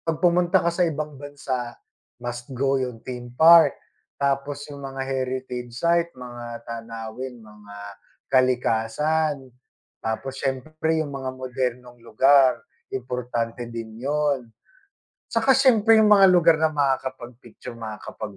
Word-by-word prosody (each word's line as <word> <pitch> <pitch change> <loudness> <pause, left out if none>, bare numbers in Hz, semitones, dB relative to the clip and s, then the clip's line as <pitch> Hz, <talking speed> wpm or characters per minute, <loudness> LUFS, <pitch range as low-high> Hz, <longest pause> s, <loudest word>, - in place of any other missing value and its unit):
pag 165 -2 -2
pumunta 175 0 +3
ka 170 - +2
sa 175 0 +2
ibang 150 -2 -5
bansa, 130 -4 -5 0.5
must 120 +1 -5
go 135 +1 +1
yung 125 -3 -5
theme 125 -1 -7
park, 160 -1 +7 0.4
tapos 140 +1 -1
yung 140 - -9
mga 135 -1 -5
heritage 130 -2 -4
site, 170 +3 +2
mga 120 -2 -8
tanawin, 115 +2 -7
mga 105 -1 -14 0.6
kalikasan, 130 +3 +1 0.5
tapos 130 +4 -4
siyempre 155 +4 -1
yung 145 - -8
mga 135 -1 -4
modernong 125 -1 -4
lugar 130 +3 +4 0.4
importante 120 -2 -3
din 115 -1 -8
'yun 140 -2 -1 0.8
'tsaka 245 +3 +4
siyempre 225 -4 +5
yung 215 -1 +5
mga 195 -1 +8
lugar 170 -3 +5
na 160 - +4
makakapag-picture 130 -5 -3
makakapag 110 -2 -8
130 Hz, 120 wpm, -24 LUFS, 120-150 Hz, 0.8 s, mga